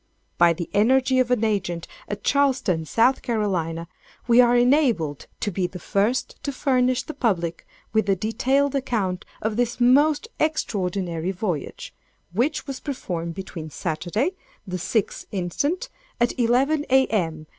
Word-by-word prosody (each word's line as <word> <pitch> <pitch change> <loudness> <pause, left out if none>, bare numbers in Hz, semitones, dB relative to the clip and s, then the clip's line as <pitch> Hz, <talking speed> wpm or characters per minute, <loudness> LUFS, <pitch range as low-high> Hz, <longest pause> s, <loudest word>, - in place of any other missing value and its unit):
By 170 -1 +6
the 170 0 -5
energy 255 +4 +3
of 255 -1 +2
an 245 -3 +2
agent 180 -6 -1 0.2
at 205 - -5
Charleston, 255 - +1
S.C., 205 -9 +1 0.4
we 240 +1 +7
are 240 0 +4
enabled 240 - +2
to 205 - -1
be 180 0 -1
the 180 - -9
first 215 +7 -1
to 285 - -3
furnish 255 -2 +1
the 310 - -7
public 175 - -1 0.3
with 220 -2 +2
a 195 - +4
detailed 265 +8 +1
account 215 -9 -1 0.2
of 220 0 -1
this 245 0 0
most 290 - +4
extraordinary 185 - -1
voyage, 180 -6 -4 0.4
which 260 - 0
was 275 -2 -5
performed 170 - -4
between 170 -4 -7
Saturday, 175 - -2 0.3
the 185 -2 -4
6th 205 +4 -1
instant, 205 - -1 0.3
at 240 0 +2
11, 265 +6 +2
A.M. 195 -12 +2
220 Hz, 135 wpm, -24 LUFS, 180-260 Hz, 0.4 s, we